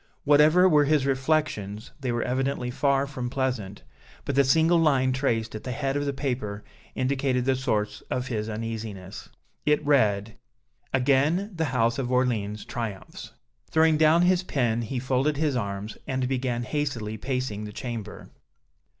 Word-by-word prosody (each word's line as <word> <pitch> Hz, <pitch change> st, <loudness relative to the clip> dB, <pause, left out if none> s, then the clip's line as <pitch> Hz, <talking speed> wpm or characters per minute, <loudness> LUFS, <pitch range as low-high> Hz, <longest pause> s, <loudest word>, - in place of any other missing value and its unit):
Whatever 155 Hz, +5 st, +6 dB
were 150 Hz, -4 st, +4 dB
his 150 Hz, -2 st, +2 dB
reflections, 130 Hz, -7 st, -1 dB
they 130 Hz, -3 st, -2 dB
were 120 Hz, -1 st, -1 dB
evidently 130 Hz, 0 st, -1 dB
far 140 Hz, +1 st, +1 dB
from 130 Hz, -3 st, -5 dB
pleasant; 120 Hz, -, -3 dB, 0.4 s
but 140 Hz, -, -1 dB
the 140 Hz, +1 st, +4 dB
single 160 Hz, +5 st, +4 dB
line 135 Hz, -5 st, +3 dB
traced 115 Hz, -4 st, -1 dB
at 110 Hz, -, -7 dB
the 125 Hz, -, -4 dB
head 135 Hz, 0 st, -2 dB
of 145 Hz, 0 st, -1 dB
the 140 Hz, -, 0 dB
paper 125 Hz, -7 st, -3 dB, 0.3 s
indicated 130 Hz, -1 st, 0 dB
the 135 Hz, 0 st, +2 dB
source 110 Hz, -5 st, -1 dB
of 125 Hz, 0 st, -2 dB
his 110 Hz, -4 st, -3 dB
uneasiness. 110 Hz, -3 st, -6 dB, 0.3 s
It 150 Hz, 0 st, +2 dB
read: 110 Hz, -6 st, +2 dB, 0.5 s
"Again 145 Hz, -, +2 dB
the 165 Hz, -2 st, -1 dB
House 120 Hz, -3 st, +1 dB
of 130 Hz, -, -1 dB
Orléans 115 Hz, -5 st, 0 dB
triumphs!" 110 Hz, -5 st, -6 dB, 0.4 s
Throwing 160 Hz, -1 st, +4 dB
down 160 Hz, +2 st, +5 dB
his 180 Hz, 0 st, +3 dB
pen, 120 Hz, -9 st, 0 dB
he 120 Hz, +3 st, -4 dB
folded 130 Hz, +3 st, 0 dB
his 150 Hz, -3 st, +1 dB
arms, 100 Hz, -2 st, -4 dB
and 130 Hz, -1 st, -1 dB
began 125 Hz, -2 st, -1 dB
hastily 120 Hz, -6 st, -3 dB
pacing 125 Hz, -4 st, -3 dB
the 105 Hz, -, -7 dB
chamber. 115 Hz, -3 st, -7 dB
130 Hz, 155 wpm, -26 LUFS, 115-145 Hz, 0.5 s, Whatever